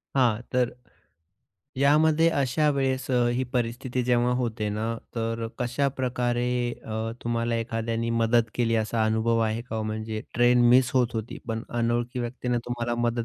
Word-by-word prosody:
हां, 120 -5 +3
तर 125 -1 +2 1.1
यामध्ये 155 +4 +4
अशा 145 0 +1
वेळेस 135 -1 -1
अ, 125 -1 +3
ही 130 - 0
परिस्थिती 125 +1 -1
जेव्हा 120 0 +2
होते 115 -4 -2
ना, 105 +2 -2 0.3
तर 115 0 -2
कशाप्रकारे 125 -1 0 0.4
अ, 110 +1 -3
तुम्हाला 115 0 -1
एखाद्याने 115 0 -2
मदत 115 0 +2
केली 115 -2 +1
असा 110 0 0
अनुभव 110 +1 +1
आहे 110 +2 -2
का 120 -2 -6
ओ? - - -1
म्हणजे 110 0 -4
ट्रेन 120 +1 +4
मिस 130 0 +5
होत 125 -2 +2
होती, 110 0 -4
पण 115 0 -2 0.2
अनोळखी 120 +1 0
व्यक्तीनं 120 0 -2
तुम्हाला 120 -1 -2
मदत 120 0 0
120 Hz, 150 wpm, -26 LUFS, 115-125 Hz, 1.1 s, मिस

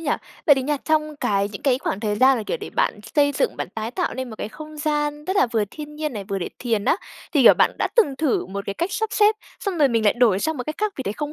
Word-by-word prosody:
nhỉ? 310 -3 -2 0.4
Vậy 290 - +8
thì 265 - -1
nha, 295 +2 0
trong 305 -1 0
cái 200 -5 0
những 200 - -8
cái 260 -2 +2
khoảng 195 - -3
thời 210 -1 -1
gian 260 +2 +5
mà, 220 - -3
kiểu, - - -1
để - - -8
bạn - - 0 0.2
xây 285 -1 +4
dựng, - - 0
bạn - - -4
tái 220 +1 -3
tạo 350 +8 -2
nên 260 -2 -5
một 220 - -8
cái - - -4
không 310 +4 -10
gian 295 -1 -1
rất 375 +3 -1
là - - +5
vừa 220 -3 +2
thiên 300 -1 -9
nhiên 305 -2 -3
này, 205 -3 -5
vừa 195 -1 -3
để 180 - -3
thiền 225 -4 -1
á, - - +3 0.4
thì, 285 -5 +4
kiểu, - - +9
bạn - - +4
đã - - +1
từng 290 - +4
thử 300 -4 0
một 200 +2 -5
cái 200 - -3
cách 360 +4 -2
sắp 440 - -1
xếp 425 +1 +4 0.3
xong 385 -5 -3
rồi 285 - +5
mình 230 -3 +1
lại 205 - +5
đổi 235 -6 +3
sang 315 +8 -1
một 250 - -3
cách 305 - -4
khác 425 -1 0
vì 265 - -3
thấy 200 - -2
không 295 +5 -5
285 Hz, 305 wpm, -23 LUFS, 220-310 Hz, 0.4 s, kiểu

